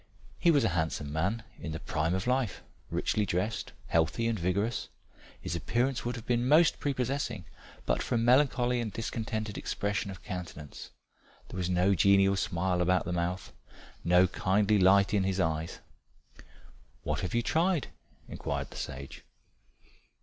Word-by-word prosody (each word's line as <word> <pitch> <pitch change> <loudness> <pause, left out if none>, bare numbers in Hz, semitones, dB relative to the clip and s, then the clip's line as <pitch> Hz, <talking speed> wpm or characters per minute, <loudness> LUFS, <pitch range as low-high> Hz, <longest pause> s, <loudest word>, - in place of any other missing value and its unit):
He 175 - +4
was 145 -4 +4
a - - +3
handsome 80 -4 -2
man 100 +9 -1 0.2
in 80 - -5
the 80 - -4
prime 80 +3 -1
of 95 - -2
life, 125 -5 0 0.3
richly 105 -1 0
dressed, 100 +4 -2
healthy 85 +8 +1
and 115 -3 -1
vigorous. 100 +7 -1 0.5
His - - -4
appearance 125 +2 0
would 120 0 -2
have 115 - -8
been 120 0 +1
most 155 +3 +5
prepossessing 130 - -2 0.4
but - - +1
for - - -1
a - - +3
melancholy 125 0 +3
and 110 -2 -3
discontented 110 -1 -3
expression 100 0 -2
of 95 -2 -9
countenance 85 -6 -7 0.6
there - - -7
was 90 -1 -1
no 90 +2 +3
genial 100 +1 +4
smile 90 -1 0
about 90 +1 +2
the 90 - -2
mouth, 90 +1 -2 0.5
no 90 +2 +5
kindly 100 +3 +2
light 100 +2 +5
in 100 - +3
the 95 0 0
eyes. 80 -2 -1 1.2
"What - - -1
have 90 +2 -3
you 120 - +2
tried?" 170 +1 +1 0.4
inquired - - -4
the - - -9
sage. 65 +1 -7
100 Hz, 155 wpm, -30 LUFS, 90-120 Hz, 1.2 s, most